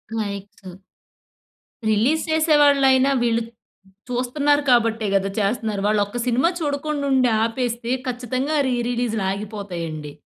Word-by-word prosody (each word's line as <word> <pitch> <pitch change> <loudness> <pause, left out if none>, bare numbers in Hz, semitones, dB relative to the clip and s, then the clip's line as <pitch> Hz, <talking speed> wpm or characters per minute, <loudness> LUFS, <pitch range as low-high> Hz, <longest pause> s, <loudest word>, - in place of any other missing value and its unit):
Likes. 200 -3 -6 1.1
Release 245 +10 +2
చేసే 315 -1 +3
వాల్లయిన 270 -2 +4
వీళ్ళు 230 -1 +1 0.7
చూస్తున్నారు 285 +4 +1
కాబట్టే 230 -2 +2
కదా! 195 0 +1
చేస్తున్నారు. 210 -1 -1
వాళ్ళు 210 0 +2
ఒక 240 +4 -6
సినిమా 255 +8 +2
చూడకుండా 290 -1 -2
ఉండి 255 -2 +3 0.2
ఆపేస్తే 235 0 -3 0.2
ఖచ్చితంగా 255 +4 -2
రి 250 - 0
రిలీజ్‌లు 235 -4 -1
ఆగిపోతాయండి. 180 -7 -6
240 Hz, 110 wpm, -22 LUFS, 210-270 Hz, 1.1 s, వాల్లయిన